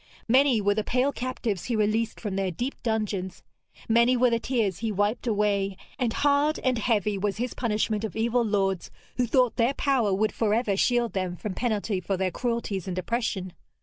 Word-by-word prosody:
Many 255 -1 +4
were 205 0 +3
the 215 +1 -1
pale 255 +5 +1
captives 240 -7 -3
he 240 - -1
released 220 +1 0
from 205 -4 -4
their 195 -1 0
deep 245 - -4
dungeons, 210 -5 -2 0.4
many 235 +2 +4
were 250 0 +4
the 230 - +2
tears 225 -7 -1
he 225 -1 -1
wiped 205 +5 0
away, 200 -3 +1 0.2
and 245 -3 +1
hard 290 +3 +2
and 255 -3 +1
heavy 210 -3 +1
was 205 +1 -1
his 245 +1 -2
punishment 215 -2 -1
of 220 - -4
evil 235 +2 +1
lords 195 -4 0 0.3
who 250 -1 +1
thought 250 -1 +2
their 245 +4 +2
power 260 -7 +1
would 210 +3 +1
for 215 -2 +1
ever 220 -4 +1
shield 240 +3 +1
them 185 -2 -2
from 200 +2 -5
penalty 215 -3 -1
for 190 +1 -2
their 185 0 0
cruelties 230 -5 -2
and 185 -1 -3
oppression. 190 -2 -2
220 Hz, 190 wpm, -26 LUFS, 200-245 Hz, 0.4 s, Many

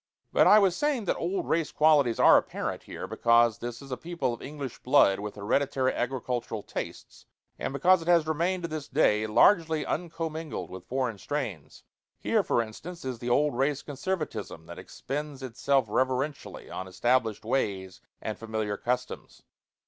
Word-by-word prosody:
But - - +5
I 210 - +8
was 195 -4 +4
saying 285 -5 0
that - - 0
old 180 +3 -2
race 165 -2 0
qualities 150 -6 +3
are - - +8
apparent - - -1
here, - - -7
because 115 -1 +3
this 120 +1 -6
is 135 - -12
a 130 - -2
people 165 -8 -2
of 120 - -9
English 140 -3 -7
blood 125 -7 +4
with 105 0 -6
hereditary 130 +5 0
agricultural 120 -3 -3
tastes, - - -7 0.3
and - - -2
because 175 +6 +4
it 165 - -9
has 170 -3 +4
remained 170 +4 -1
to - - -1
this 155 -3 -5
day 110 -7 +2
largely 160 - +4
uncommingled 165 - -4
with 95 -1 -9
foreign 125 -5 -2
strains. 100 - -5 0.4
Here, - - +2
for 120 - +1
instance, 155 +10 -9
is 130 -3 -4
the 120 - -4
old 145 +2 +2
race 135 +2 0
conservatism 140 - -4
that 85 +2 -9
expends 140 +7 -6
itself 130 +1 +1
reverentially 130 +5 -2
on 95 - -6
established 115 +2 0
ways 100 -7 -2 0.2
and 110 - -4
familiar 110 -2 -3
customs. 125 +1 -4
130 Hz, 165 wpm, -28 LUFS, 115-155 Hz, 0.4 s, I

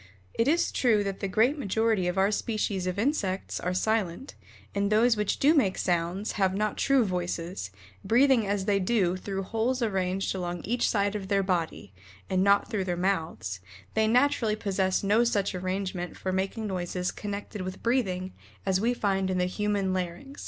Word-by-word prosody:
It 230 - +1
is 335 +4 +2
true 220 -5 +2
that 195 -1 -4
the 195 - -2
great 235 +10 +2
majority 220 -4 +1
of 180 +2 -2
our 195 +2 +3
species 205 -4 -1
of 185 +1 -2
insects 205 -6 -1
are 180 - -2
silent, 215 +4 -1 0.4
and 200 0 0
those 225 +2 +4
which 210 -1 0
do 290 +3 +4
make 225 - +2
sounds, 175 +4 -1
have 190 -2 +1
not 210 +1 0
true 270 -4 +3
voices, 175 - -3 0.3
breathing 245 -2 +4
as 200 -1 -1
they 200 -1 +2
do 185 -2 +1
through 195 +1 -4
holes 235 +5 -1
arranged 195 -3 0
along 175 -2 -4
each 240 +3 +1
side 200 -1 +1
of 200 -2 -4
their 195 0 +2
body, 170 - -2 0.4
and 185 0 +3
not 200 0 +4
through 200 -3 -2
their 175 -2 -2
mouths, 160 - -1 0.3
they 220 0 +2
naturally 245 -2 +3
possess 190 -2 0
no 210 +4 +4
such 205 -4 0
arrangement 185 -1 -3
for 185 - -3
making 195 +4 -2
noises 180 -2 -2
connected 205 0 -6
with 185 0 -6
breathing 190 -7 0 0.3
as 190 -1 +1
we 240 +3 +1
find 195 -4 0
in 185 - 0
the 180 - +2
human 200 0 -1
larynx. 185 +9 -4
195 Hz, 180 wpm, -28 LUFS, 185-220 Hz, 0.4 s, those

